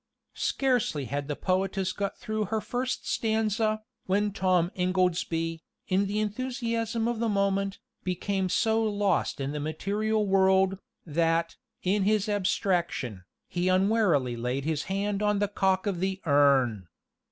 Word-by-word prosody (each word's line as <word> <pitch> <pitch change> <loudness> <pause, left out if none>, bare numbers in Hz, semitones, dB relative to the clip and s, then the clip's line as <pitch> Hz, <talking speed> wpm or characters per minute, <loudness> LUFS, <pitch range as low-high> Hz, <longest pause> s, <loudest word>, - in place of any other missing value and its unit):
Scarcely 245 - 0
had 140 +2 -3
the 145 - -2
poetess 190 +1 0
got 200 -1 -3
through 215 -3 -2
her 220 +3 -1
first 250 +3 -3
stanza, 220 -1 0 0.2
when 205 +2 +1
Tom 185 -3 +2
Ingoldsby, 175 -3 0 0.3
in 195 +1 +2
the 205 +2 -1
enthusiasm 230 0 -1
of 235 -2 -1
the 230 -1 +1
moment, 200 -1 0 0.3
became 185 +1 -1
so 225 +4 +2
lost 205 -7 0
in 135 0 -2
the 150 - -3
material 205 +8 -1
world, 190 0 +3 0.3
that, 165 +1 +1 0.3
in 200 +3 +2
his 210 +1 +2
abstraction, 175 - -1 0.2
he 175 +1 -1
unwarily 185 - +2
laid 125 +4 -2
his 155 -1 -1
hand 200 +1 -1
on 210 -1 +2
the 205 0 +1
cock 190 -1 +1
of 195 -4 -1
the 190 +1 -1
urn. 135 - +3
195 Hz, 140 wpm, -28 LUFS, 170-210 Hz, 0.3 s, world